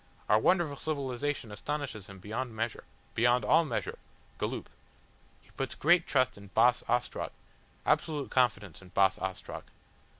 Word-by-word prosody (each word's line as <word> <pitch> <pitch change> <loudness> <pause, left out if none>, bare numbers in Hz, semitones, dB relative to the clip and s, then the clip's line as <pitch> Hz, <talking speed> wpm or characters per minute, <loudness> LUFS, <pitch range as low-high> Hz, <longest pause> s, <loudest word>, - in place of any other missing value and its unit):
Our 105 +1 +5
wonderful 160 +1 +2
civilisation 140 -5 -2
astonishes 120 -2 -4
him 100 - -10
beyond 110 +5 -4
measure. 115 0 -3 0.3
Beyond 120 +2 +3
all 165 +2 +5
measure. 125 -6 -3 0.4
Galloop. - - -2 0.8
He - - -23
puts - - -3
great 170 +2 +4
trust 130 -6 +2
in 100 - -12
Boss 120 +2 +5
Ostrog, 120 +1 0 0.6
absolute 155 -4 +1
confidence 105 - +1
in 90 - -13
Boss 95 +1 +3
Ostrog. 95 0 -5
120 Hz, 135 wpm, -31 LUFS, 105-145 Hz, 0.8 s, Our